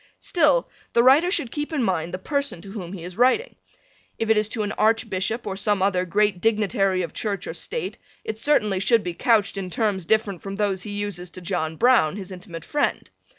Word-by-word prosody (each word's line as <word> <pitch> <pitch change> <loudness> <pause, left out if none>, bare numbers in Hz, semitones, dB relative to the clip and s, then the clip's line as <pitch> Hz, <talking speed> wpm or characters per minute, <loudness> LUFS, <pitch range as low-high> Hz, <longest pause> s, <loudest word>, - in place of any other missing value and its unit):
Still - - +2 0.3
the 235 - +5
writer 285 +8 +6
should 315 - +1
keep 295 +1 -4
in 290 -5 0
mind 175 -5 -1
the 185 - -3
person 280 - -2
to 195 - -10
whom 190 -4 -7
he 180 -4 -7
is 180 +4 -9
writing. 260 - +3 0.6
If 225 -1 0
it - - +5
is 210 0 +1
to 220 -1 -2
an 205 - -2
Archbishop 220 0 0
or 195 -2 -3
some 205 -1 +1
other 185 -2 +1
great 200 0 +1
dignitary 200 -4 +1
of 165 - -6
Church 200 -4 -3
or - - -5
state 470 - -4 0.2
it 220 0 -4
certainly 215 -9 +2
should 225 +2 +3
be 175 - -3
couched 215 +2 +2
in 190 -2 -4
terms 195 -2 -1
different 205 -3 +1
from 195 0 -6
those 200 -2 0
he 210 - -7
uses 205 -3 -4
to 180 +2 -9
John 165 -3 -2
Browne, 235 -6 +4
his 195 -2 -7
intimate 175 -3 -9
friend. 295 - -1
205 Hz, 210 wpm, -24 LUFS, 185-230 Hz, 0.6 s, writer